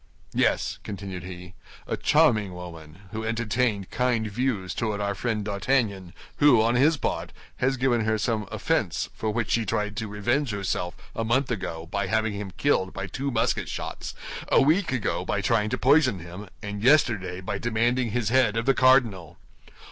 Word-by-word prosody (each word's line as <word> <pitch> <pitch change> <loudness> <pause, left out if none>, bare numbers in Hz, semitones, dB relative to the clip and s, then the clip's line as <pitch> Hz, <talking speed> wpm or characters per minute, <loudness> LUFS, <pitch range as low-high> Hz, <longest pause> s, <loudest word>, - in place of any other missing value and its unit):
Yes," - - +1
continued 95 -3 -6
he, 90 +1 -9 0.3
"a - - -2
charming 110 - +3
woman, 85 -1 -10
who 110 0 -4
entertained 110 -2 -1
kind 125 -2 +1
views 105 -5 -1
toward 110 -3 -2
our 100 0 -1
friend 110 0 -2
D'Artagnan, 100 -3 -1 0.2
who, 145 -5 +6
on 115 +2 +3
his 145 +6 +4
part, - - -3 0.3
has 130 +1 +1
given 125 -2 +2
her 110 0 +1
some 110 -2 -1
offense - - -1
for 110 - -3
which 110 -3 -1
she 115 - +2
tried 105 +1 -2
to 110 - -2
revenge 120 +7 0
herself 95 -4 -2 0.2
a 115 - -1
month 125 +4 +1
ago 85 -7 -4
by 100 +3 -2
having 110 +1 +1
him 100 -1 -5
killed 95 -10 +1
by 95 - -4
two 135 +8 -3
musket 115 -4 0
shots, - - -5 0.3
a - - +4
week 160 +5 +3
ago 130 -5 -1
by - - -1
trying 110 -2 +1
to 125 - -1
poison 135 -5 +4
him, 90 +4 -9 0.2
and 105 -1 -5
yesterday 115 -9 +3
by 95 +1 -4
demanding 120 +2 +1
his 110 0 -1
head 120 -3 +3
of 115 - -1
the 135 - +4
cardinal." 125 - +3
110 Hz, 175 wpm, -26 LUFS, 100-125 Hz, 0.3 s, who